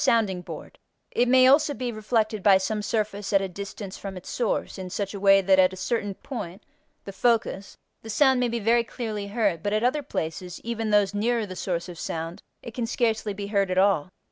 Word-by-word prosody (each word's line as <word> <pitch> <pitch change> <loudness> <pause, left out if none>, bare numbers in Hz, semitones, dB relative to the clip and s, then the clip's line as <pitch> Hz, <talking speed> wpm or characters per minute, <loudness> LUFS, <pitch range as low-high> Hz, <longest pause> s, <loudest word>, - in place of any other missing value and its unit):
sounding 205 -6 +2
board); - - -10 0.3
it 245 - +2
may 255 +1 +6
also 285 +2 +5
be 250 -2 -3
reflected 215 -1 -1
by 195 0 +6
some 210 +3 -2
surface 205 -1 -2
at 195 - +5
a 195 - -2
distance 200 +1 -7
from 195 -2 -6
its 180 - -9
source 230 -4 -2
in 185 -1 -6
such 195 +2 -3
a 200 - -5
way 195 0 +6
that 190 0 +4
at 185 0 +5
a - - -8
certain 205 0 -2
point 205 -7 -7 0.4
(the 195 - -6
focus) 215 -2 0 0.2
the 225 - -10
sound 265 +3 +4
may 250 - +2
be 235 0 -2
very 230 +2 +3
clearly 220 -4 -5
heard, 200 -6 0
but 205 +3 -1
at 215 +1 +1
other 260 +5 +2
places, 175 - -5
even 225 -1 -2
those 205 -1 +3
nearer 225 +2 0
the 185 -2 -8
source 175 -2 -3
of 175 -2 -9
sound, 165 +4 -5 0.2
it 235 - -8
can 235 -1 -2
scarcely 225 -3 0
be 200 0 -5
heard 200 -2 +1
at 185 - -1
all. 190 -4 +3
205 Hz, 220 wpm, -25 LUFS, 190-230 Hz, 0.4 s, may